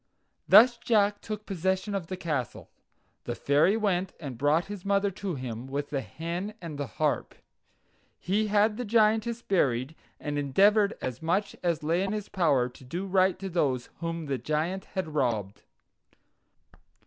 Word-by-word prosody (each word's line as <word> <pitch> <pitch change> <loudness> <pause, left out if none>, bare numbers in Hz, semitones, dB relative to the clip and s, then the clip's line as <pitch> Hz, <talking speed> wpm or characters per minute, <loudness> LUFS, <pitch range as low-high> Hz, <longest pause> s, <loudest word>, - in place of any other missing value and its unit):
Thus 240 +2 +8
Jack 210 -4 +2
took 215 0 -6
possession 190 +2 -1
of 190 -4 -3
the 185 - -5
castle. 150 -9 -4 0.5
The - - -3
Fairy 150 +9 +3
went 190 -4 0
and 140 -6 -6
brought 145 +7 +2
his 205 -2 -8
mother 200 0 +1
to 190 -2 -4
him, 125 -2 -6
with 140 +2 -4
the 140 -2 -1
hen 170 - -5
and 160 -4 -7
the 145 - -2
harp. - - 0 0.8
He 210 +4 0
had 210 +1 +3
the 250 - -2
Giantess 225 +1 +2
buried, 135 -7 +1 0.3
and 145 -1 -3
endeavored 200 +9 +3
as 130 -1 -4
much 185 +5 0
as 170 -3 0
lay 165 +4 +1
in 195 +1 -1
his 210 -1 -4
power 145 -10 +2
to 125 +1 -14
do 175 +9 -4
right 190 -1 +2
to 195 +1 -5
those 140 -9 0
whom 165 -1 -3
the 135 -3 -2
Giant 160 +5 -2
had 175 -5 -4
robbed. 110 -9 -1
175 Hz, 160 wpm, -28 LUFS, 145-200 Hz, 0.8 s, Thus